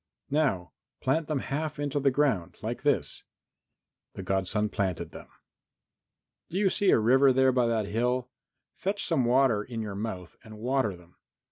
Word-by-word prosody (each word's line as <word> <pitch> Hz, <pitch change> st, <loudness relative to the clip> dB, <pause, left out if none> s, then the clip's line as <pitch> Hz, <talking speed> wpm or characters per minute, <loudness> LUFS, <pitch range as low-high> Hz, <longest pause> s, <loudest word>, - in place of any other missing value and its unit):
"Now 135 Hz, -, +1 dB, 0.3 s
plant 150 Hz, +4 st, 0 dB
them 155 Hz, -, 0 dB
half 150 Hz, +2 st, -3 dB
into 145 Hz, 0 st, -1 dB
the 140 Hz, 0 st, +3 dB
ground, 130 Hz, -, 0 dB
like -, -, -3 dB
this." -, -, 0 dB, 0.9 s
The 95 Hz, -, -7 dB
godson 95 Hz, +3 st, 0 dB
planted 90 Hz, -5 st, -2 dB
them. -, -, -11 dB, 1.2 s
"Do 180 Hz, -, -3 dB
you 195 Hz, -2 st, +3 dB
see 200 Hz, -, +2 dB
a -, -, +6 dB
river 130 Hz, +5 st, +5 dB
there 130 Hz, 0 st, +4 dB
by 125 Hz, -2 st, +2 dB
that 115 Hz, -2 st, 0 dB
hill? 125 Hz, +4 st, -1 dB, 0.4 s
Fetch 200 Hz, +1 st, -2 dB
some 155 Hz, -8 st, +1 dB
water 125 Hz, -3 st, +3 dB
in 115 Hz, +2 st, -6 dB
your 105 Hz, -2 st, -4 dB
mouth 95 Hz, -4 st, -5 dB
and 110 Hz, -1 st, -11 dB
water 120 Hz, -4 st, 0 dB
them. 85 Hz, 0 st, -20 dB
125 Hz, 160 wpm, -28 LUFS, 105-140 Hz, 1.2 s, a